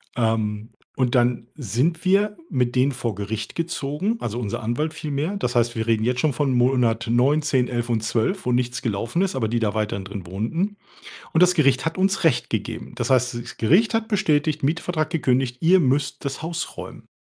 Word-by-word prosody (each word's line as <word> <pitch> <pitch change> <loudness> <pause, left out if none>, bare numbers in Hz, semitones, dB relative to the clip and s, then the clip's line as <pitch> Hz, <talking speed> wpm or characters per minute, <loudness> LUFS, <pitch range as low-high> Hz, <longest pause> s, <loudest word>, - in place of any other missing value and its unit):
Ähm, 110 -1 0 0.3
und 130 -1 +1
dann 120 -1 +2
sind 145 - -1
wir 205 +3 +3
mit 125 -2 0
denen 130 +2 +3
vor 120 -5 -3
Gericht 105 +2 -5
gezogen, 170 +5 -2
also, 115 +1 -4
unser 120 0 -3
Anwalt 135 +8 -1
vielmehr. 155 +7 -3
Das 125 -9 -2
heißt, 120 -1 +2
wir 110 0 -2
reden 110 -1 +2
jetzt 125 +1 0
schon 150 -2 +2
von 135 +1 0
Monat 120 -2 +2
9, 135 +6 +3
10, 130 -4 +1
11 120 -1 -2
und 115 -2 +1
12, 115 - 0
wo 125 - +1
nichts 125 +1 0
gelaufen 115 - -1
ist, 190 -7 0
aber 115 -4 0
die 120 +1 0
da 110 -2 0
weiterhin 105 -3 -2
drin 95 -3 -7
wohnten, 165 - -2 0.5
und 165 +2 +5
das 180 0 +5
Gericht 135 -4 +3
hat 165 +2 -2
uns 195 -1 +1
recht 125 -7 +2
gegeben. - - -4
Das - - -2
heißt, 125 -1 +2
das 115 - -10
Gericht 185 - +3
hat 225 0 0
bestätigt: 155 -7 +1
„Mietvertrag 155 +1 0
gekündigt- 130 -5 +1
ihr 180 +3 +5
müsst 140 -1 0
das 140 +2 -3
Haus 165 +1 -4
räumen.“ - - -9
130 Hz, 200 wpm, -23 LUFS, 115-160 Hz, 0.5 s, und